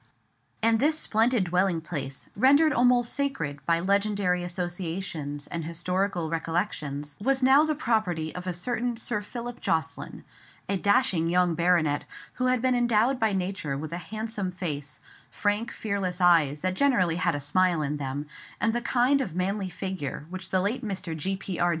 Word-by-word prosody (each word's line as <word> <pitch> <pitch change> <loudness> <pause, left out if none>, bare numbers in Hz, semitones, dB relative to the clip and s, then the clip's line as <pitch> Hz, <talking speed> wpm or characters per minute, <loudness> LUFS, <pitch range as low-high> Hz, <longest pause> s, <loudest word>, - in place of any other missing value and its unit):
And 225 0 +4
this 305 +4 +3
splendid 230 -4 +2
dwelling 180 0 +1
place, 140 -4 -5
rendered 285 +7 +5
almost 245 -1 +3
sacred 215 - -2
by 165 0 +3
legendary 200 -1 +1
associations 175 -4 -3
and 170 -1 -4
historical 175 +2 -1
recollections, 155 -3 -3
was 265 +3 +1
now 270 +3 +6
the 310 -1 0
property 190 - 0
of 180 +1 -7
a - - +1
certain 240 +6 -2
Sir 225 -2 -2
Philip 240 +3 -7
Jocelyn—a 165 +4 -3
dashing 195 -4 +2
young 180 0 +3
baronet, 170 -4 +2 0.4
who 255 - +3
had 255 -1 +1
been 255 -1 +3
endowed 240 +1 +2
by 220 -1 +2
nature 185 -7 -2
with 155 +3 -6
a - - -2
handsome 215 +1 -4
face, 150 -6 -5 0.3
frank, 205 +3 -1
fearless 195 -4 -2
eyes 160 -5 +4
that 185 0 0
generally 185 -9 +2
had 175 -2 +1
a - - -2
smile 170 +3 +2
in 150 +1 -2
them, 140 +1 -4 0.3
and 225 -1 +1
the 240 - -1
kind 255 +3 +2
of 180 -10 -4
manly 190 +1 -1
figure 180 -7 -5
which 185 0 -5
the 185 - +2
late 230 +7 -1
Mr. 190 -5 -4
G.P.R. 180 +1 -1
185 Hz, 160 wpm, -27 LUFS, 165-225 Hz, 0.4 s, now